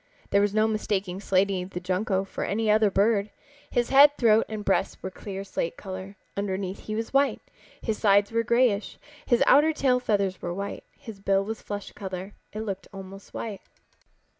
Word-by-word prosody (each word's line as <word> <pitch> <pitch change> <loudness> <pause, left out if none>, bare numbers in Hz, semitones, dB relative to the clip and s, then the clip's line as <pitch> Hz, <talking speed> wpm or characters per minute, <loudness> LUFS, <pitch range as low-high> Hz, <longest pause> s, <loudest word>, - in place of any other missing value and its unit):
There 200 - +4
was 205 0 +2
no 215 0 +4
mistaking 205 -4 -2
Slaty 195 -1 +1
the 180 -1 -6
Junco 190 +2 0
for 195 - -5
any 215 +1 +1
other 215 0 +4
bird. 200 +1 +2 0.4
His 240 -1 0
head, 285 +2 +7
throat 225 -2 +4
and 215 -1 -5
breast 195 - +1
were 190 - -4
clear 195 +1 -6
slate 180 -3 -3
color. 190 0 -7 0.2
Underneath 195 -1 -3
he 215 - -2
was 225 +3 -4
white. 275 +1 +3 0.4
His 220 -2 -2
sides 205 -1 +4
were 230 0 +2
grayish. 235 -2 +1 0.3
His 240 -2 +4
outer 305 +3 +5
tail 260 -4 +2
feathers 200 -6 0
were 175 0 -3
white. 200 +1 -5
His 220 -4 -10
bill 195 0 +2
was 220 +1 -5
flesh 205 -1 -6
color. 190 0 -6 0.2
It 215 - -5
looked 195 -4 -5
almost 195 0 -10
white. 210 -4 -5
205 Hz, 180 wpm, -26 LUFS, 195-220 Hz, 0.4 s, head